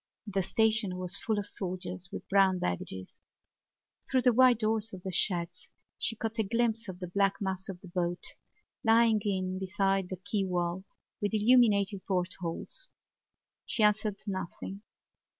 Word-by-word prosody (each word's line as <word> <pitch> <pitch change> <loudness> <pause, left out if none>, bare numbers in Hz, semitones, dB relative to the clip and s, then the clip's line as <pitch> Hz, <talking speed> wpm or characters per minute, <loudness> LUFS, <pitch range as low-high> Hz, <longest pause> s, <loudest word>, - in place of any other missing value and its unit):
The 200 -2 0
station 220 -1 +1
was 180 -1 -3
full 220 -2 -1
of 205 - -1
soldiers 180 -2 -4
with - - -7
brown 195 -1 +4
baggages. 95 - -4 0.9
Through 260 -2 +2
the 250 -1 +5
wide 250 0 +6
doors 220 -1 0
of 185 -1 -8
the 190 - -3
sheds 175 -1 0 0.3
she 225 - -2
caught 225 +1 -3
a - - +4
glimpse 230 +1 0
of 180 -1 -7
the 180 - -4
black 195 +2 +2
mass 190 -1 -3
of 180 -2 -7
the 190 - -11
boat, 175 0 -2 0.6
lying 225 -1 +5
in 185 -2 -1
beside 195 0 0
the 185 - -4
quay 195 +2 -1
wall, 180 0 -1 0.4
with 205 +1 0
illumined 215 -2 +5 0.2
portholes. 185 - -3 0.8
She 220 - +1
answered 210 -1 +3
nothing. 190 +1 -5
195 Hz, 150 wpm, -30 LUFS, 180-220 Hz, 0.9 s, wide